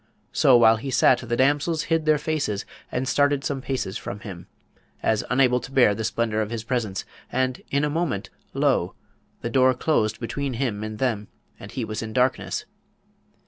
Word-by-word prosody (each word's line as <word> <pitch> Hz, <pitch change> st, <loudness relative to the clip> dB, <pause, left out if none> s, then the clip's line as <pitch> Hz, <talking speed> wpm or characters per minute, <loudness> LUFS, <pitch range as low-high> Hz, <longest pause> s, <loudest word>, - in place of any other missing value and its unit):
So, 130 Hz, -2 st, +5 dB
while 115 Hz, -1 st, +6 dB
he 135 Hz, +5 st, -5 dB
sat 125 Hz, -, +4 dB
the 120 Hz, -, -2 dB
damsels 145 Hz, +4 st, +2 dB
hid 165 Hz, -3 st, 0 dB
their 155 Hz, -1 st, +5 dB
faces 150 Hz, -9 st, -2 dB, 0.3 s
and 130 Hz, +1 st, -2 dB
started 145 Hz, +2 st, +2 dB
some 135 Hz, -2 st, -2 dB
paces 130 Hz, -8 st, -3 dB
from 100 Hz, +1 st, -6 dB
him, 90 Hz, -4 st, -9 dB, 0.6 s
as 110 Hz, -1 st, +2 dB
unable 125 Hz, 0 st, +3 dB
to 125 Hz, -, -10 dB
bear 125 Hz, -6 st, +5 dB
the 110 Hz, -, -4 dB
splendour 110 Hz, 0 st, 0 dB
of 105 Hz, -, -2 dB
his 115 Hz, -1 st, -4 dB
presence, 110 Hz, -5 st, -2 dB, 0.3 s
and 130 Hz, 0 st, 0 dB
in 140 Hz, +1 st, +1 dB
a -, -, +2 dB
moment, 155 Hz, -, -2 dB, 0.2 s
lo! -, -, +1 dB, 0.5 s
the 120 Hz, -, -3 dB
door 130 Hz, 0 st, +4 dB
closed 110 Hz, -6 st, +1 dB
between 135 Hz, +3 st, -3 dB
him 115 Hz, -5 st, -2 dB
and 110 Hz, 0 st, -5 dB
them, 110 Hz, -5 st, -1 dB, 0.3 s
and 100 Hz, -, -10 dB
he 125 Hz, -4 st, -2 dB
was 110 Hz, 0 st, -4 dB
in 110 Hz, -1 st, -6 dB
darkness. 125 Hz, +1 st, 0 dB
125 Hz, 185 wpm, -24 LUFS, 110-140 Hz, 0.6 s, while